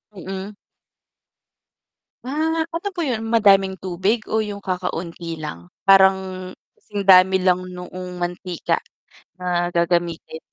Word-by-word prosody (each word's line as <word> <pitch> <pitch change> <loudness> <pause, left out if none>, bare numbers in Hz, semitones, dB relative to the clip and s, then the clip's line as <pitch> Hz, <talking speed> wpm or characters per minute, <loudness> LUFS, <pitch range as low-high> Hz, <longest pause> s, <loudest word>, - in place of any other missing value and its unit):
Mm. 190 +2 -6 1.7
Ah, 320 +4 -1
ano 335 +5 -4
po 365 - -9
'yon? 245 -8 -1
Madaming 195 -4 +4
tubig 190 +5 -1
o 220 0 +1
yung 205 -1 -5
kakaunti 170 -3 -4
lang? 85 - -8 0.2
Parang 190 -1 +4 0.2
singdami 190 -2 +4
lang 185 0 +2
noong 180 0 -8
mantika 175 0 -2 0.6
na 175 -1 -1
gagamitin. 170 -1 0
185 Hz, 105 wpm, -22 LUFS, 180-205 Hz, 1.7 s, Madaming